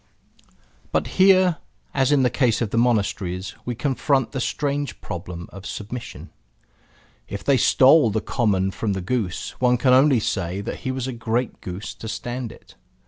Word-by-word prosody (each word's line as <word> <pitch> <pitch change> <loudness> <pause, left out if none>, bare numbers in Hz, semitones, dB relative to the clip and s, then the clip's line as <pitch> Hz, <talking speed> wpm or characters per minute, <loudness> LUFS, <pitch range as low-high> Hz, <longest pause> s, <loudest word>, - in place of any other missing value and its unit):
But - - +1 0.2
here, 185 -3 +5 0.4
as 135 0 +2
in 140 -2 +4
the 125 - +2
case 120 -5 +2
of 115 -4 -2
the - - -1
monasteries, 100 -6 0
we 120 - -3
confront 135 0 0
the 130 - -3
strange 145 0 -2
problem 85 0 -7
of 100 +1 -9
submission. 115 +3 -7 1.0
If 100 -1 -6
they 135 +4 +3
stole 135 +2 +5
the 110 +1 0
common 100 -5 0
from 105 +1 -2
the 95 - -3
goose, 100 -2 -2
one 125 -1 +4
can 125 +1 +3
only 135 -1 +5
say 95 -3 -2
that - - -5
he 130 - -3
was 130 -1 -3
a 130 - -4
great 120 +1 -2
goose 95 +3 -6
to 110 - -9
stand 120 +1 -4
it. - - -17
120 Hz, 170 wpm, -23 LUFS, 100-130 Hz, 1.0 s, here